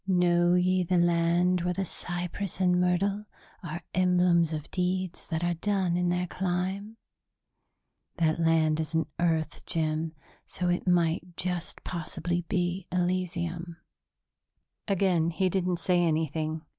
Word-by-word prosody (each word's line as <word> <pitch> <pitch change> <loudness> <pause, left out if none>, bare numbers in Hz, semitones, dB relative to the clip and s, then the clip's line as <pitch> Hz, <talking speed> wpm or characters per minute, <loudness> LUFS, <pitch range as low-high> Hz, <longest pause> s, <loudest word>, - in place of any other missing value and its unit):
'Know 175 -1 +3
ye 185 +1 +3
the 180 +1 +1
land 175 +1 +3
where 180 +1 -1
the 195 +1 -1
cypress 175 +2 -5
and 180 -1 +3
myrtle 195 +3 +1 0.4
are 170 -2 -6
emblems 180 -2 +3
of 155 -2 -5
deeds 185 -1 -2
that 160 -1 -2
are 175 0 +1
done 185 0 0
in 180 0 +1
their 180 +1 0
clime...?' 190 +4 -3 1.2
That 160 -1 +1
land 160 -1 +3
isn't 160 0 -1
Earth, 160 -2 0
Jim, 160 0 -1 0.3
so 180 -1 -2
it 175 +1 -1
might 175 0 +1
just 180 -2 -3
possibly 175 0 -3
be 180 0 -1
Elysium." 175 -1 -2 1.1
Again 185 -5 +2
he 185 +2 +1
didn't 180 -1 0
say 180 0 +2
anything. 155 -1 -1
175 Hz, 130 wpm, -28 LUFS, 165-180 Hz, 1.2 s, Know